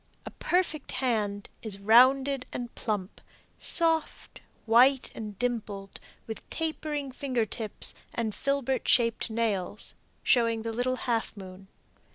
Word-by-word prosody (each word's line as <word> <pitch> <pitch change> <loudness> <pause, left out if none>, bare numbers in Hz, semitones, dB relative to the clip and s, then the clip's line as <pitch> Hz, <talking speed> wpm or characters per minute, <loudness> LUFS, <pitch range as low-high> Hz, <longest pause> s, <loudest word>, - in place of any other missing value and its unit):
A - - -6
perfect 345 -5 -1
hand 210 -5 -1
is 215 -3 -4
rounded 255 +5 +5
and 240 -1 -5
plump, 205 -4 -3 0.4
soft, 325 -2 0 0.2
white 250 +4 +5
and 210 -3 -7
dimpled, 210 -5 -3 0.3
with 220 - -8
tapering 305 -3 -3
finger 255 -3 -1
tips 215 0 -1 0.2
and 225 -2 -2
filbert 275 0 -1
shaped 230 -1 +3
nails, 215 -4 -2 0.3
snowing 230 -3 +3
the 230 0 -3
little 250 +2 0
half 230 -3 -1
moon. 190 0 -10
235 Hz, 120 wpm, -28 LUFS, 215-265 Hz, 0.4 s, rounded